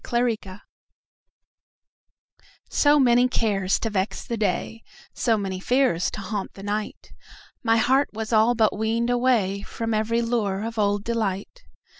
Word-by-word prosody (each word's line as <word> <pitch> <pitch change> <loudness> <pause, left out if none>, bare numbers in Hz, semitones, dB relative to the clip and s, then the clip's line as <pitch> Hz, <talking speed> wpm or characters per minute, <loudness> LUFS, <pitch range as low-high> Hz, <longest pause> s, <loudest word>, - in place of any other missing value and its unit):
Summer 240 0 0
Magic 210 -5 -4 2.1
SO 290 0 +4
many 245 -1 +4
cares 200 -6 0
to 225 - -2
vex 195 0 -2
the 235 - -3
day, 220 +1 -2 0.3
So 230 -3 +1
many 190 -2 -3
fears 245 -5 +1
to 215 - -7
haunt 200 0 -5
the 195 - -10
night, 210 +1 -4 0.5
My 225 -1 +2
heart 260 +5 +3
was 220 +1 -5
all 225 +2 +4
but 220 -3 +2
weaned 225 +3 0
awayFrom 230 -3 0
every 230 +2 0
lure 215 -4 -1
of 230 -1 -5
old 205 -1 +1
delight. 220 - -3
220 Hz, 140 wpm, -24 LUFS, 200-235 Hz, 2.1 s, SO